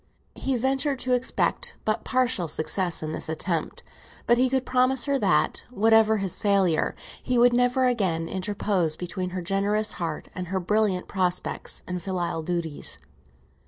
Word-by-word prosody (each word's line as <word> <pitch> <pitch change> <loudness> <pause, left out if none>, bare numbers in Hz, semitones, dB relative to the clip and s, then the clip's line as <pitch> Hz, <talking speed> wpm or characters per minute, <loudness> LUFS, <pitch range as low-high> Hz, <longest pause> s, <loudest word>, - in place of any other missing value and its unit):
He 270 -2 -1
ventured 270 +3 +1
to 255 - +1
expect 250 +1 0
but 215 0 0
partial 250 -9 +1
success 170 +3 0
in 155 - -3
this - - -5
attempt, 160 0 -2 0.4
but 240 0 +4
he 255 0 +4
could 260 0 0
promise 255 0 +2
her 280 -1 +1
that, - - +2
whatever 220 -1 +4
his 195 -3 -2
failure, 195 -6 +2 0.3
he 250 -1 0
would 240 0 +5
never 245 +1 +3
again 190 -10 0
interpose 190 -3 -1
between 180 +1 -3
her 180 0 -5
generous 205 +3 0
heart 165 -3 -4
and 180 -1 -5
her 190 +2 -1
brilliant 195 0 +1
prospects 180 -2 -2
and 180 -1 -3
filial 175 -2 -2
duties. 165 -2 -3
200 Hz, 155 wpm, -26 LUFS, 175-245 Hz, 0.4 s, would